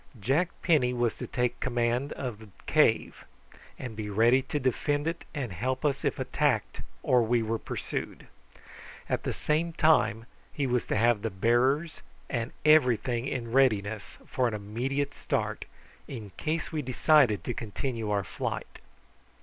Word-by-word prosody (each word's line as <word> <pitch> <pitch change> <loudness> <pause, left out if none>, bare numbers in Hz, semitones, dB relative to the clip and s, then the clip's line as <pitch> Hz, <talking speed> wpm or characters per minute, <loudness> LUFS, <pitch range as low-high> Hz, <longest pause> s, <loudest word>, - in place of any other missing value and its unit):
Jack 140 - +1
Penny 140 -8 +3
was 120 -2 +1
to - - -5
take 125 -1 -1
command 120 +2 0
of 120 -6 -5
the 110 -2 -13 0.2
cave, - - +2 0.5
and 125 -4 -6
be 105 -1 -4
ready 115 +6 +4
to 145 +3 -3
defend 145 +3 0
it 165 +1 -3
and 130 -7 -3
help 130 - -2
us 140 -2 0
if - - 0
attacked - - 0 0.2
or 125 -1 +4
we 115 0 +2
were 110 0 -1
pursued. - - -5 0.8
At - - -1
the - - -2
same 165 +2 0
time 135 -9 +3 0.3
he 145 - -2
was 125 -2 0
to - - 0
have 115 -1 +3
the 115 - -1
bearers 125 - +1 0.3
and 115 0 -2
everything 125 -5 +4
in 120 -4 -3
readiness 110 -6 +1
for 130 -1 0
an 110 - -2
immediate 125 +8 -2
start, - - -2 0.4
in 110 -7 -7
case 155 +1 -2
we 155 -2 -1
decided 130 -3 +3
to 120 - -2
continue 115 0 -4
our 100 -1 +1
flight. - - -5
125 Hz, 155 wpm, -28 LUFS, 115-140 Hz, 0.8 s, ready